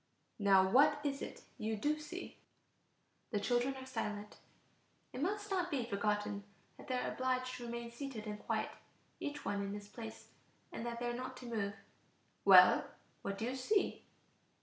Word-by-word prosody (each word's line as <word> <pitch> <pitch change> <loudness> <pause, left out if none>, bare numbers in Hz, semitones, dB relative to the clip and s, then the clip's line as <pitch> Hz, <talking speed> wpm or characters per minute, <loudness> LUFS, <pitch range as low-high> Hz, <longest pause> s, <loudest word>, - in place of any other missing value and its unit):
"Now 195 -2 +6
what 290 +7 +6
is 275 -1 0
it - - -6 0.2
you 220 0 0
do 300 +8 +1
see?" 300 - -7 0.9
The 210 - 0
children 245 +5 +1
are 260 0 -7
silent. 210 -4 -4 0.8
It 255 - -4
must 410 +5 -1
not 360 -2 +1
be 270 -7 0
forgotten 210 -1 0 0.3
that - - -13
they 255 - 0
are - - -1
obliged 255 0 0
to 240 -1 -6
remain 235 0 -4
seated 240 -3 -5
and 210 -1 -4
quiet, - - -1 0.5
each 290 0 -4
one 200 0 0
in 200 0 -3
his 205 0 -7
place, 225 +1 -8 0.4
and - - -5
that 235 0 -3
they 240 - -2
are 240 - 0
not 255 +1 -5
to 250 - -9
move. 205 -4 -2 0.7
"Well, - - +9 0.4
what 200 0 -3
do 220 - -2
you 255 +2 -1
see?" 385 +11 +1
240 Hz, 170 wpm, -36 LUFS, 210-265 Hz, 0.9 s, Well